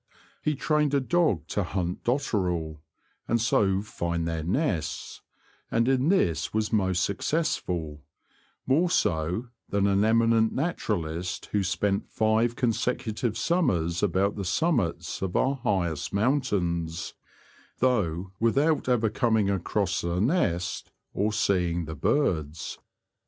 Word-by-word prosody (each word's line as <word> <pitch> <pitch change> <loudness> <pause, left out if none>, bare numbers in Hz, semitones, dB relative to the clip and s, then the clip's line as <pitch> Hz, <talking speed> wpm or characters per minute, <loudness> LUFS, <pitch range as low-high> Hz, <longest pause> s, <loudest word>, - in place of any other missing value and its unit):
He 150 - 0
trained 150 0 +1
a - - +4
dog 130 - +1
to 105 - 0
hunt 90 -1 -3
dotterel, 90 - -1 0.5
and 115 - +2
so 100 -4 +2
find 85 -5 -3
their 80 -1 -2
nests, 90 - -2 0.5
and 115 +1 +1
in 135 +3 +2
this 90 - +1
was 110 +1 -1
most 95 -4 +2
successful 90 - -1 0.3
— - - -35 0.3
more 160 +7 +3
so 85 - 0 0.2
than 100 -1 +1
an 100 -1 +3
emi 115 +2 +4
nent 110 -1 +3
naturalist 90 - -2
who 105 - +2
spent 95 +3 -1
five 110 +2 +1
consecutive 115 -2 -1
summers 90 - +1
about 100 +1 +1
the 100 - -4
summits 90 - 0
of 95 -2 -3
our 135 +1 +2
highest 90 - -1
mountains, 90 - 0 0.6
though 95 -8 0
without 140 +6 +2
ever 120 -3 +3
coming 110 -3 +2
across 95 -3 -1
a 85 +1 -1
nest 95 - 0 0.2
or 105 +2 0
seeing 90 -5 +1
the 80 - -6
birds. 85 - -1
100 Hz, 125 wpm, -27 LUFS, 85-125 Hz, 0.6 s, a